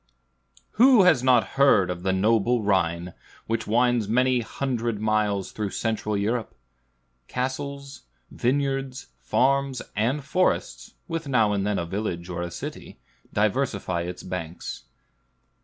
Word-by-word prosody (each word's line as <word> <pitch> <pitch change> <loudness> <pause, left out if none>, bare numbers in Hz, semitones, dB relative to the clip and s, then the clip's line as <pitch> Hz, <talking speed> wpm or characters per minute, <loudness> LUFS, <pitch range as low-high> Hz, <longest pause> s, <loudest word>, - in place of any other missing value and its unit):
Who 250 -5 +8
has 160 -9 +5
not 125 -2 +3
heard 100 -10 +5
of 90 -1 -5
the 95 +1 0
noble 110 +4 +2
Rhine, 85 -3 0 0.3
which 115 0 -2
winds 120 0 +2
many 125 +3 +2
hundred 120 -2 -2
miles 105 -2 0
through 105 -2 -3
Central 105 +1 -2
Europe? 110 +3 -2 0.7
Castles, 140 +1 -4 0.3
vineyards, 135 0 -1
farms, 140 0 +1 0.2
and 125 +8 0
forests, 65 - -1
with 165 -2 -4
now 115 -6 +3
and 100 0 -1
then 105 - 0
a 85 - -2
village 90 -2 -4
or 85 -1 -4
a 85 - -3
city, - - -8 0.3
diversify 105 -5 0
its 90 +1 -6
banks. 85 -7 -6
110 Hz, 125 wpm, -25 LUFS, 95-130 Hz, 0.7 s, Who